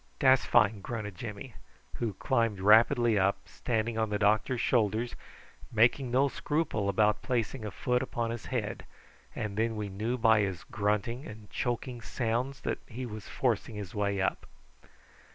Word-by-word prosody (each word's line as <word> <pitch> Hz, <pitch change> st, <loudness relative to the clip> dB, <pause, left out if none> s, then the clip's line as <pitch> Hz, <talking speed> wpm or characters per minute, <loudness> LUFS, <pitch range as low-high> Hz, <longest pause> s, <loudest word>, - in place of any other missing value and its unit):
"Dat's 130 Hz, -2 st, +5 dB
fine," 105 Hz, -3 st, +4 dB
grunted 110 Hz, -2 st, -5 dB
Jimmy, 110 Hz, +4 st, -7 dB, 0.4 s
who 115 Hz, -4 st, -2 dB
climbed 115 Hz, -5 st, 0 dB
rapidly 110 Hz, +2 st, +5 dB
up, 95 Hz, +1 st, +2 dB
standing 115 Hz, -1 st, -2 dB
on 110 Hz, -1 st, +1 dB
the 105 Hz, -, 0 dB
doctor's 110 Hz, +4 st, +2 dB
shoulders, 115 Hz, 0 st, +1 dB, 0.6 s
making 120 Hz, +3 st, +3 dB
no 130 Hz, +3 st, +3 dB
scruple 145 Hz, -8 st, -1 dB
about 105 Hz, +1 st, +2 dB
planting 120 Hz, -1 st, -2 dB
a -, -, -3 dB
foot 125 Hz, +5 st, 0 dB
upon 120 Hz, -3 st, -2 dB
his 115 Hz, -1 st, -6 dB
head, 110 Hz, -5 st, -3 dB, 0.5 s
and 105 Hz, -2 st, -3 dB
then 115 Hz, 0 st, +1 dB
we 105 Hz, -1 st, -3 dB
knew 110 Hz, +6 st, -2 dB
by 110 Hz, -2 st, +5 dB
his 95 Hz, -5 st, -1 dB
grunting 110 Hz, +5 st, -1 dB
and 105 Hz, -1 st, -11 dB
choking 120 Hz, 0 st, -3 dB
sounds 125 Hz, +4 st, -2 dB
that -, -, -2 dB
he 125 Hz, +2 st, -6 dB
was 110 Hz, -3 st, -8 dB
forcing 115 Hz, -3 st, -1 dB
his 100 Hz, -3 st, -6 dB
way 100 Hz, -1 st, 0 dB
up. 95 Hz, -, -1 dB
110 Hz, 155 wpm, -30 LUFS, 105-120 Hz, 0.6 s, Dat's